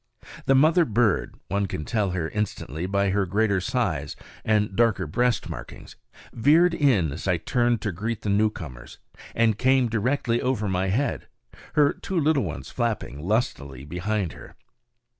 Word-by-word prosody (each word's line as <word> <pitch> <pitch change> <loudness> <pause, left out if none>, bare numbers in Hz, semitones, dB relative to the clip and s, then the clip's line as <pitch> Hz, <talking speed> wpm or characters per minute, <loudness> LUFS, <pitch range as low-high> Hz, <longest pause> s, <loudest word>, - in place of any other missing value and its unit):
The 135 - +5
mother 160 +6 +5
bird 115 - +1
one 100 +1 0
can 75 - -5
tell 105 -3 0
her 90 -3 -2
instantly 90 - -3
by 100 0 +1
her 100 -1 +1
greater 100 0 +1
size - - -1 0.3
and 105 -2 +1
darker 115 -5 +2
breast 120 +9 0
markings - - -9 0.4
veered 160 +8 +4
in 110 - +2
as 80 - -6
I 90 -2 +2
turned 120 +5 0
to 105 - -2
greet 110 +6 -4
the 105 - -3
newcomers, 95 - -2 0.4
and 110 -2 +2
came 130 -1 +3
directly 120 +2 0
over 125 -5 0
my 95 0 0
head, 125 +10 -1 0.5
her 145 -1 +4
two 190 -3 -3
little 155 -2 +2
ones - - -6
flapping 115 - -2
lustily 75 - -2
behind 90 +3 -2
her. - - -13
105 Hz, 155 wpm, -25 LUFS, 95-125 Hz, 0.5 s, The